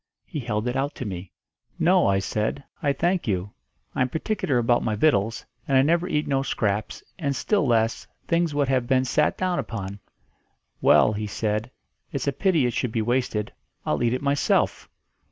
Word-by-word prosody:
He 155 Hz, -, -5 dB
held 115 Hz, -2 st, -2 dB
it 125 Hz, -, -1 dB
out 140 Hz, +2 st, -1 dB
to 130 Hz, -, -5 dB
me. 95 Hz, -2 st, -6 dB, 0.5 s
'No,' -, -, +4 dB
I 100 Hz, 0 st, +3 dB
said. 105 Hz, +7 st, -2 dB, 0.2 s
'I 140 Hz, -1 st, +2 dB
thank 175 Hz, +4 st, 0 dB
you. 95 Hz, 0 st, -1 dB, 0.4 s
I -, -, -1 dB
am 130 Hz, -, +2 dB
particular 160 Hz, -3 st, -1 dB
about 120 Hz, 0 st, +3 dB
my 110 Hz, -2 st, 0 dB
vittles, 110 Hz, -3 st, +1 dB, 0.2 s
and 135 Hz, -, +3 dB
I 130 Hz, -, +6 dB
never 170 Hz, +4 st, +2 dB
eat 150 Hz, -3 st, 0 dB
no 135 Hz, -1 st, +1 dB
scraps, 110 Hz, -6 st, -2 dB, 0.2 s
and, 140 Hz, -4 st, -1 dB
still 150 Hz, -, +1 dB
less, 115 Hz, -1 st, +1 dB, 0.2 s
things 170 Hz, -3 st, +1 dB
what 145 Hz, -2 st, +2 dB
have 130 Hz, -2 st, +1 dB
been 130 Hz, 0 st, +3 dB
sat -, -, +1 dB
down 185 Hz, -1 st, 0 dB
upon.' 100 Hz, -3 st, -5 dB, 0.8 s
'Well,' 110 Hz, -, +5 dB
he 105 Hz, 0 st, -3 dB
said, 105 Hz, +2 st, -2 dB, 0.4 s
'it's 135 Hz, -3 st, -3 dB
a 140 Hz, -, 0 dB
pity 165 Hz, -3 st, +2 dB
it 120 Hz, -, 0 dB
should 125 Hz, -, -1 dB
be 115 Hz, -1 st, 0 dB
wasted, 120 Hz, -3 st, -1 dB, 0.3 s
I'll 75 Hz, -, 0 dB
eat 120 Hz, +1 st, +2 dB
it 130 Hz, -, -5 dB
myself.' 140 Hz, 0 st, +1 dB
125 Hz, 190 wpm, -25 LUFS, 110-145 Hz, 0.8 s, I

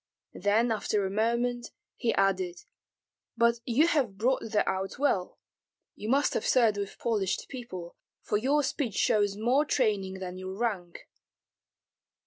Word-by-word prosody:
Then 220 Hz, +4 st, +2 dB
after 210 Hz, -2 st, 0 dB
a 190 Hz, -, -2 dB
moment 235 Hz, +3 st, 0 dB, 0.3 s
he 230 Hz, -, 0 dB
added: 185 Hz, -3 st, 0 dB, 0.7 s
"But 235 Hz, 0 st, +3 dB
you 255 Hz, +6 st, +3 dB
have 270 Hz, -12 st, +1 dB
brought 255 Hz, +5 st, +1 dB
that 215 Hz, -1 st, +1 dB
out 190 Hz, 0 st, -2 dB
well. 245 Hz, -10 st, 0 dB, 0.6 s
You 210 Hz, -, -6 dB
must 280 Hz, +3 st, +3 dB
have -, -, -1 dB
served 230 Hz, -5 st, +3 dB
with 200 Hz, -1 st, -5 dB
polished 210 Hz, -5 st, -1 dB
people, 185 Hz, -10 st, -7 dB, 0.3 s
for -, -, 0 dB
your 280 Hz, +7 st, +2 dB
speech 260 Hz, -5 st, -2 dB
shows 205 Hz, -3 st, +2 dB
more 245 Hz, +7 st, +3 dB
training 210 Hz, -9 st, 0 dB
than 185 Hz, -1 st, -6 dB
your 185 Hz, +1 st, -6 dB
rank." 200 Hz, -7 st, -3 dB
215 Hz, 140 wpm, -29 LUFS, 195-245 Hz, 0.7 s, But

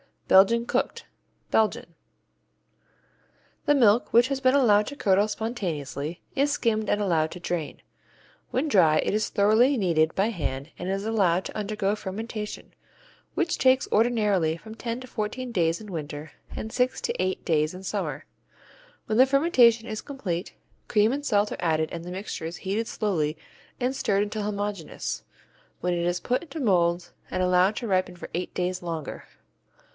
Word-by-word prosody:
Belgian 230 Hz, +5 st, +5 dB
Cooked -, -, -1 dB, 0.5 s
Belgium 215 Hz, -5 st, +1 dB, 1.7 s
The 290 Hz, -, +4 dB
milk, 230 Hz, -3 st, +4 dB
which 240 Hz, +3 st, +5 dB
has 275 Hz, -1 st, -1 dB
been 260 Hz, 0 st, +3 dB
allowed 210 Hz, -6 st, +4 dB
to 285 Hz, -, -6 dB
curdle 200 Hz, -4 st, +3 dB
spontaneously, 175 Hz, -, -4 dB
is 280 Hz, +2 st, +2 dB
skimmed 220 Hz, -6 st, 0 dB
and 205 Hz, -, +1 dB
allowed 165 Hz, -5 st, +1 dB
to 180 Hz, -, -8 dB
drain. 170 Hz, -3 st, -4 dB, 0.7 s
When 265 Hz, +5 st, 0 dB
dry 165 Hz, -, +5 dB
it -, -, 0 dB
is 215 Hz, +1 st, +1 dB
thoroughly 220 Hz, +7 st, +4 dB
kneaded 165 Hz, -6 st, +2 dB
by 200 Hz, +3 st, +2 dB
hand 150 Hz, -7 st, -4 dB
and 180 Hz, -, -4 dB
is 195 Hz, +1 st, -2 dB
allowed 190 Hz, -5 st, +2 dB
to -, -, -7 dB
undergo 210 Hz, -1 st, -1 dB
fermentation, 210 Hz, +2 st, -6 dB, 0.6 s
which 335 Hz, -2 st, 0 dB
takes 260 Hz, 0 st, +3 dB
ordinarily 210 Hz, -8 st, +2 dB
from 220 Hz, +5 st, -11 dB
ten 235 Hz, +2 st, -4 dB
to 255 Hz, -, -9 dB
fourteen 245 Hz, +2 st, -4 dB
days 165 Hz, -5 st, +1 dB
in 210 Hz, -2 st, -9 dB
winter 150 Hz, -2 st, -6 dB, 0.2 s
and 220 Hz, -, -5 dB
six 250 Hz, +1 st, 0 dB
to -, -, -2 dB
eight 185 Hz, 0 st, -1 dB
days 155 Hz, -1 st, +1 dB
in 185 Hz, -, -9 dB
summer. -, -, -3 dB, 0.8 s
When 215 Hz, -, -1 dB
the 260 Hz, -, +9 dB
fermentation 255 Hz, -6 st, +4 dB
is 215 Hz, -1 st, -4 dB
complete, 195 Hz, -, -4 dB, 0.3 s
cream 210 Hz, +1 st, +3 dB
and 285 Hz, +2 st, -3 dB
salt 210 Hz, -3 st, +2 dB
are -, -, -4 dB
added 160 Hz, -2 st, +1 dB
and 170 Hz, 0 st, -6 dB
the -, -, -6 dB
mixture 190 Hz, -3 st, -5 dB
is 165 Hz, +2 st, -5 dB
heated 210 Hz, +4 st, -1 dB
slowly 160 Hz, -8 st, -1 dB, 0.4 s
and 250 Hz, +1 st, 0 dB
stirred 200 Hz, -6 st, +1 dB
until 210 Hz, 0 st, -4 dB
homogeneous, 205 Hz, -4 st, -4 dB, 0.6 s
when 180 Hz, 0 st, 0 dB
it 170 Hz, 0 st, -1 dB
is 175 Hz, 0 st, -1 dB
put 250 Hz, +1 st, 0 dB
into 315 Hz, -1 st, -7 dB
molds 175 Hz, -5 st, +2 dB, 0.2 s
and 185 Hz, -, -1 dB
allowed 180 Hz, +3 st, +3 dB
to 235 Hz, -, -4 dB
ripen 185 Hz, -2 st, 0 dB
for 175 Hz, -, -9 dB
eight 180 Hz, +2 st, -3 dB
days 180 Hz, 0 st, -1 dB
longer. 165 Hz, -4 st, -5 dB
205 Hz, 165 wpm, -26 LUFS, 175-230 Hz, 1.7 s, the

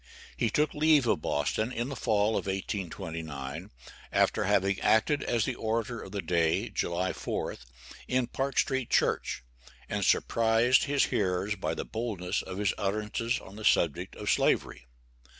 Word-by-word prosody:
He 115 Hz, -, +1 dB
took 150 Hz, +7 st, +1 dB
leave 150 Hz, -2 st, +4 dB
of 110 Hz, -, +1 dB
Boston 110 Hz, +9 st, 0 dB
in 120 Hz, +1 st, -2 dB
the 140 Hz, -, -4 dB
fall 110 Hz, -4 st, +2 dB
of 110 Hz, -, -1 dB
1829, 80 Hz, -7 st, -4 dB, 0.4 s
after -, -, +2 dB
having 100 Hz, +1 st, +2 dB
acted 125 Hz, +7 st, +3 dB
as 115 Hz, -3 st, 0 dB
the 130 Hz, -, -1 dB
orator 115 Hz, 0 st, -2 dB
of 95 Hz, -, -9 dB
the 100 Hz, -1 st, -3 dB
day, 85 Hz, -2 st, +1 dB
July 90 Hz, +2 st, -1 dB
4th, 65 Hz, -, -4 dB, 0.4 s
in 130 Hz, -1 st, +1 dB
Park 135 Hz, +3 st, -3 dB
Street 130 Hz, -3 st, +1 dB
church, -, -, +1 dB, 0.4 s
and -, -, -2 dB
surprised 115 Hz, +3 st, +3 dB
his 145 Hz, -1 st, +2 dB
hearers 95 Hz, +1 st, 0 dB
by 95 Hz, -, -2 dB
the -, -, -4 dB
boldness 100 Hz, -5 st, -2 dB
of 95 Hz, 0 st, -7 dB
his 100 Hz, -1 st, +1 dB
utterances 105 Hz, +4 st, -1 dB
on 100 Hz, +2 st, -12 dB
the 110 Hz, -, -8 dB
subject 85 Hz, -7 st, +2 dB
of -, -, -1 dB
Slavery. -, -, +1 dB
105 Hz, 155 wpm, -29 LUFS, 95-120 Hz, 0.4 s, leave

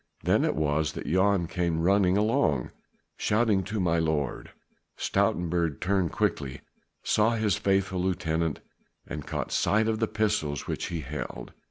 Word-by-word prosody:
Then -, -, +3 dB
it -, -, +1 dB
was 75 Hz, 0 st, 0 dB
that -, -, -6 dB
Jan 95 Hz, +1 st, +2 dB
came 85 Hz, -1 st, -1 dB
running 95 Hz, 0 st, +3 dB
along, 90 Hz, -, +1 dB, 0.5 s
shouting 105 Hz, -3 st, +2 dB
to 105 Hz, +2 st, -3 dB
my 85 Hz, -2 st, +2 dB
lord. 80 Hz, -3 st, -1 dB, 0.5 s
Stoutenburg 85 Hz, -3 st, 0 dB
turned 95 Hz, -1 st, +1 dB
quickly, 70 Hz, -2 st, -1 dB, 0.4 s
saw 110 Hz, +2 st, +2 dB
his 110 Hz, -5 st, +1 dB
faithful 95 Hz, -1 st, 0 dB
lieutenant 85 Hz, -4 st, -1 dB, 0.4 s
and 75 Hz, -1 st, -7 dB
caught -, -, -3 dB
sight 110 Hz, +2 st, +2 dB
of 110 Hz, -1 st, 0 dB
the 115 Hz, -, +1 dB
pistols 105 Hz, -11 st, -1 dB
which -, -, -3 dB
he 85 Hz, -2 st, -4 dB
held. 75 Hz, +2 st, -6 dB
90 Hz, 145 wpm, -27 LUFS, 80-100 Hz, 0.5 s, Then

